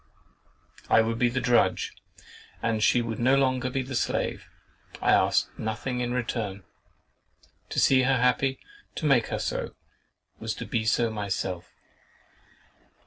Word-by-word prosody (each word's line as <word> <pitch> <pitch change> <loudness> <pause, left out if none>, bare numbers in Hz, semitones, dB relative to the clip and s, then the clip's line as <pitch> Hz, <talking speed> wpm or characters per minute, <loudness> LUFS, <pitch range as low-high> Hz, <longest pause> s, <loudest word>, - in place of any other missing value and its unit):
I 110 - +6
would 115 +1 -2
be 125 - +3
the 130 +2 -1
drudge 120 -2 +2 0.7
and 115 -2 0
she 120 +3 +4
should 115 -2 -4
no 130 +3 +4
longer 130 -2 +1
be 130 +1 -2
the 130 +1 -7
slave. 120 - -1 0.5
I - - +2
asked - - +3
nothing 110 +4 -3
in 120 0 -1
return. 115 -5 -3 1.1
To - - -1
see 130 -1 +5
her 130 +1 +2
happy, 125 +2 +2 0.4
to 155 - -4
make 135 -6 +4
her - - -2
so, - - -3 0.6
was - - -3
to - - -6
be 110 -1 -1
so 115 +1 +2
myself. 95 -4 -3
120 Hz, 140 wpm, -27 LUFS, 110-130 Hz, 1.1 s, I